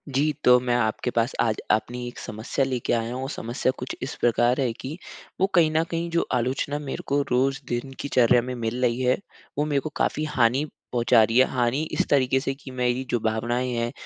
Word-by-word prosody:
जी, 150 +3 +3
तो 125 0 +7
मैं 125 -1 0
आपके 110 +1 0
पास 115 +2 0
आज 110 -2 +2 0.2
अपनी 120 +3 -1
एक 120 - -8
समस्या 110 +5 -2
लेके 130 -3 -1
आया 115 +1 -1
हूँ, 130 - -4
वो 135 - -3
समस्या 125 -1 -1
कुछ 125 - -5
इस 135 - -4
प्रकार 120 +2 +3
है 125 -3 +1
कि 135 +7 -7 0.4
वो 190 - +5
कहीं 165 -3 +5
न 160 +1 +2
कहीं, 165 0 -3
जो 170 0 +1
आलोचना 130 +4 -1
मेरे 145 -2 -5
को 140 +1 +2
रोज़ 135 +2 +2
दिन 120 +3 -3
की - - -3
चर्या 125 -1 +4
में 125 +1 -5
मिल 120 +1 -3
रही 120 0 +1
है, 125 0 +3 0.4
वो 150 - +1
मेरे 145 -2 +1
को 155 - -5
काफ़ी 155 - 0
हानि 125 +3 +3 0.3
पहुँचा 120 -1 +4
रही 115 +2 +1
है। 130 - +7
हानि 125 +2 +1
इस - - 0
तरीके 135 -2 +3
से 135 0 -2
कि 135 -1 -11
मेरी 125 0 0
जो 120 - +1
भावनाएँ 120 +3 -1
हैं, 120 0 -1
125 Hz, 220 wpm, -25 LUFS, 120-135 Hz, 0.4 s, तो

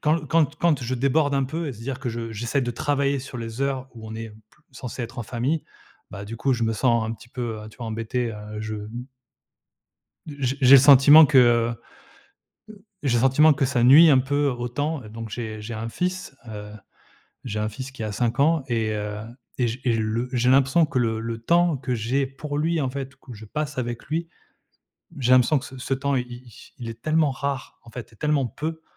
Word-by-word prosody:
quand 155 +1 +1
quand 155 +1 +3
t 145 +2 -18
quand 155 -6 +2
je 125 +2 -2
déborde 140 +3 +1
un 135 - +1
peu, 160 +4 -4
et - - -4
se 115 - -13
dire 130 +2 -5
que 135 - -3
je 115 -1 -5
j'essaie 120 +6 -1
de 120 -1 -2
travailler 140 +2 0
sur 130 -2 -8
les 115 +2 -6
heures 135 -1 -1
où 110 -1 -10
on 110 - -7
est, 115 0 -6
mmh - - -15
p 110 0 -22 0.2
censé 125 0 -6
être 120 +2 -7
en - - -2
famille, 125 +8 -2 0.5
bah, 100 +1 -7
du 115 +3 -7
coup, 135 +3 +1
je 120 - -1
me 115 - 0
sens 115 +1 +2
un 110 - -3
petit 115 +2 -12
peu, 115 -4 -5
heu, 110 - -9
tu 110 - -17
vois, 120 - -5
embêté, 115 +2 -2
heu, 105 0 -8
je 110 0 -4
m 110 +4 -7 1.2
d 150 - -8
j 130 0 0
j'ai 130 +1 +8
le - - +7
sentiment 145 +3 +9
que 135 -2 +4
heu 120 -1 +5
heu, - - -4 1.3
j'ai 120 -4 +2
le - - +1
sentiment 150 +4 +5
que 135 -1 0
ça 125 -2 +1
nuit 150 +6 +8
un 135 - +6
peu 145 +2 0
au 120 -2 -2
temps 145 +2 -2
et 110 - -11
donc 115 +1 -7
j'ai 110 -1 -6
j'ai 110 +2 -6
un 110 +1 -4
fils, 180 +2 -3
heu, 105 -1 -8 0.7
j'ai 110 -4 -4
un 105 - -1
fils 130 +5 -7
qui 130 -4 -8
a 110 - -3
5 120 +3 -1
ans 155 0 +3
et 115 -2 0
heu, 105 0 -4 0.4
et 125 -2 +2
j 115 +3 -5
et 120 - +2
je 115 - 0
le 110 +3 -2
j'ai 125 0 +2
l'impression 135 +5 +4
que 130 - -2
le 110 -2 0
le 115 0 -4
temps 170 +6 +2
que 130 -1 -3
j'ai 125 +5 0
pour 145 +2 -6
lui, 165 +2 0
en 135 -3 -1
fait, 135 0 -6
que 130 -3 -12
je 110 - -11
passe 150 +5 -4
avec 120 -1 -4
lui, 165 +2 -3 0.9
j'ai 130 -1 +2
l'impression 130 +4 +5
que 135 - -9
c 130 - -12
ce 130 +1 -2
temps 140 +1 -1
il 125 -1 -1
il 120 -1 -11 0.3
il 120 -2 -6
est 115 0 -11
tellement 155 -1 +2
rare, 135 0 -4
en 115 - -14
fait 120 -1 -9
et - - -19
tellement 150 0 +1
peu. 160 +6 -5
125 Hz, 240 wpm, -24 LUFS, 115-140 Hz, 1.3 s, sentiment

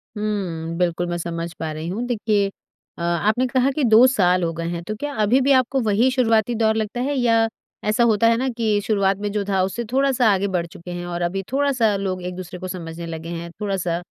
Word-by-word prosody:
हुँ, 180 -6 -3
बिल्कुल 175 -1 0
मैं 175 0 -2
समझ 170 0 -4
पा 160 -1 -3
रही 155 +2 -5
हूँ। 220 +7 -3
देखिए 210 -4 +1 0.5
अ, - - -8
आपने 205 +8 +1
कहा 255 +1 +2
कि 290 +1 -2
2 230 0 +7
साल 185 -8 +2
हो 165 - 0
गए 165 0 -4
हैं 170 0 -4
तो 215 +5 -4
क्या 290 0 -4
अभी 245 +6 +3
भी 275 +2 +3
आपको 260 +1 +2
वही 220 +4 +3
शुरुआती 235 -2 +2
दौर 220 -1 +2
लगता 220 +2 -2
है? 280 +3 0
या 230 -3 +3 0.4
ऐसा 215 +3 +2
होता 230 -1 +4
है 230 0 +4
ना, 260 - -1
कि 225 -3 0
शुरुआत 200 -3 +2
में 205 0 -3
जो 205 -1 -1
था 190 -1 +2
उससे 195 +5 -2
थोड़ा-सा 265 -3 +3
आगे 195 +1 0
बढ़ 180 -3 -1
चुके 170 +1 -10
हैं 175 0 -5
और 175 0 -4
अभी 190 +3 -1
थोड़ा-सा 260 -6 +2
लोग 190 -2 -2
एक-दूसरे 180 0 -6
को 185 - -5
समझने 170 -2 -6
लगे 165 0 -6
हैं, 170 0 -6
थोड़ा-सा 190 -4 -1
200 Hz, 225 wpm, -22 LUFS, 175-230 Hz, 0.5 s, 2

